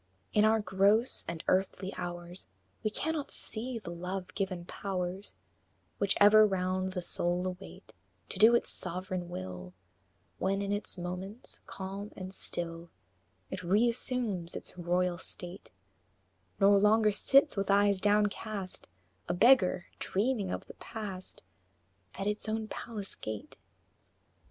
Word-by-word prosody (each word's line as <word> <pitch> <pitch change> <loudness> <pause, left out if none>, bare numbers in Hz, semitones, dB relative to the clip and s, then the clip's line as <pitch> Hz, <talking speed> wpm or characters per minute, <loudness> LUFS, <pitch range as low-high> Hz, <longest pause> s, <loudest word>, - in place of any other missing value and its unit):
In 210 0 +5
our 220 +1 +4
gross 210 +4 +3
and 170 -1 -5
earthly 190 +1 +1
hours 175 0 -6 0.4
We 215 - +2
cannot 305 +6 -2
see 240 +2 -4
the 190 -6 -7
Love 180 +2 -5
given 185 -3 -2
powers 185 0 -4 0.6
Which 200 -1 +2
ever 210 +1 +8
round 185 -2 0
the 180 -2 -3
soul 175 +1 +1
await 185 +1 -7 0.4
To 190 - -5
do 225 +3 +8
its - - +1
sovereign 185 0 -2
will, 90 - -7 0.6
When, 195 +1 0
in 200 - -2
its 205 -1 -1
moments 180 +6 -6
calm 195 +2 -6
and 185 0 -7
still, 170 -2 -5 0.6
It - - -4
re 200 +7 +3
assumes 230 -8 -1
its - - -6
royal 175 0 0
state, 180 +1 -8 0.9
Nor 200 0 +6
longer 215 +1 +5
sits 275 +8 +4
with 195 -1 -1
eyes 200 -1 +4
downcast, 205 -1 0 0.4
A - - +1
beggar, 190 -5 +5
dreaming 210 -1 0
of - - -4
the - - -11
past, 195 -4 -7 0.7
At 195 - -4
its 210 +1 -1
own 220 0 -2
palace 210 -4 -6
gate. 110 -1 -7
195 Hz, 130 wpm, -31 LUFS, 180-210 Hz, 0.9 s, ever